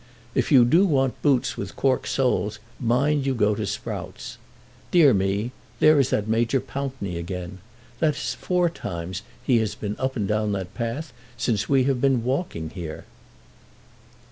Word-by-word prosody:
If -, -, 0 dB
you 125 Hz, -4 st, +7 dB
do 165 Hz, +10 st, +5 dB
want 135 Hz, -5 st, +1 dB
boots 140 Hz, -4 st, +2 dB
with 100 Hz, -, -5 dB
cork 130 Hz, -2 st, +1 dB
soles 105 Hz, -6 st, 0 dB, 0.2 s
mind 140 Hz, +5 st, +2 dB
you 135 Hz, -, +1 dB
go 105 Hz, -2 st, +3 dB
to 105 Hz, -1 st, -3 dB
Sprout's. -, -, -6 dB, 0.5 s
Dear 155 Hz, -7 st, +6 dB
me; 100 Hz, +4 st, 0 dB, 0.3 s
there 155 Hz, -1 st, +6 dB
is 135 Hz, -2 st, +3 dB
that 105 Hz, 0 st, 0 dB
Major 115 Hz, +4 st, +2 dB
Pountney 130 Hz, -11 st, -4 dB
again. 90 Hz, +2 st, -6 dB, 0.4 s
That 155 Hz, -3 st, +2 dB
is 145 Hz, -, -3 dB
four 180 Hz, -1 st, +1 dB
times 90 Hz, -, -5 dB, 0.2 s
he 125 Hz, -3 st, +3 dB
has 105 Hz, -2 st, -1 dB
been 105 Hz, -1 st, -4 dB
up 130 Hz, 0 st, -1 dB
and 105 Hz, -5 st, -1 dB
down 105 Hz, 0 st, 0 dB
that 95 Hz, -1 st, -4 dB
path 125 Hz, +5 st, -4 dB, 0.2 s
since 115 Hz, -3 st, 0 dB
we 135 Hz, -2 st, +4 dB
have 130 Hz, -2 st, 0 dB
been 135 Hz, -4 st, +3 dB
walking 125 Hz, -, -2 dB
here." 85 Hz, -4 st, -7 dB
120 Hz, 165 wpm, -24 LUFS, 100-135 Hz, 0.5 s, you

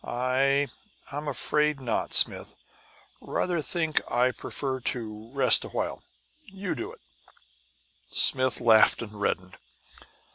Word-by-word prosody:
"I 135 Hz, +3 st, +1 dB, 0.4 s
I'm 145 Hz, +2 st, -5 dB
afraid 150 Hz, +2 st, 0 dB
not, 125 Hz, -3 st, -2 dB
Smith. -, -, +4 dB, 0.7 s
Rather 175 Hz, -3 st, -1 dB
think 160 Hz, 0 st, -1 dB
I'd 125 Hz, +1 st, +1 dB
prefer 135 Hz, -2 st, -4 dB
to 110 Hz, -3 st, -5 dB
rest 140 Hz, 0 st, +4 dB
a -, -, -8 dB
while. -, -, -3 dB, 0.4 s
You 195 Hz, -4 st, -5 dB
do -, -, -6 dB
it!" -, -, -16 dB, 1.1 s
Smith 130 Hz, -2 st, +2 dB
laughed 110 Hz, 0 st, +4 dB
and 105 Hz, -2 st, -10 dB
reddened. 90 Hz, -2 st, -2 dB
130 Hz, 115 wpm, -27 LUFS, 120-150 Hz, 1.1 s, Smith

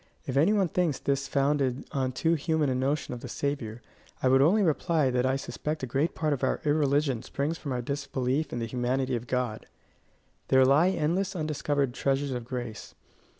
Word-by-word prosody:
If 130 Hz, -, -4 dB
any 155 Hz, +9 st, +4 dB
one 200 Hz, -3 st, +3 dB
thinks 165 Hz, -4 st, 0 dB
this 140 Hz, 0 st, -1 dB
founded 140 Hz, -2 st, +1 dB
on 130 Hz, -3 st, -1 dB
too 160 Hz, +6 st, +1 dB
human 160 Hz, -2 st, +1 dB
a -, -, +1 dB
notion 135 Hz, +2 st, -1 dB
of 125 Hz, -, -6 dB
the 130 Hz, -, -8 dB
Saviour, 120 Hz, -5 st, -3 dB, 0.4 s
I 130 Hz, -, +4 dB
would 135 Hz, +1 st, +5 dB
only 195 Hz, +9 st, +4 dB
reply 155 Hz, -4 st, +2 dB
that 125 Hz, +1 st, +1 dB
I 130 Hz, -, +2 dB
suspect 150 Hz, +2 st, -4 dB
a -, -, +1 dB
great 140 Hz, +6 st, -1 dB
part 155 Hz, -2 st, 0 dB
of 140 Hz, -, -4 dB
our 130 Hz, -, +1 dB
irreligion 145 Hz, -4 st, +2 dB
springs 150 Hz, +4 st, -3 dB
from 140 Hz, -, -5 dB
our 125 Hz, -1 st, -2 dB
disbelief 140 Hz, +1 st, -2 dB
in -, -, -3 dB
the 115 Hz, -, -2 dB
humanity 125 Hz, +2 st, -1 dB
of 120 Hz, +1 st, -5 dB
God. 125 Hz, -3 st, -2 dB, 0.8 s
There 130 Hz, 0 st, +5 dB
lie 150 Hz, +7 st, +5 dB
endless 185 Hz, +3 st, 0 dB
undiscovered 145 Hz, -4 st, -1 dB
treasures 135 Hz, +1 st, 0 dB
of 125 Hz, -2 st, -4 dB
grace. 120 Hz, -3 st, -6 dB
140 Hz, 195 wpm, -28 LUFS, 130-150 Hz, 0.8 s, would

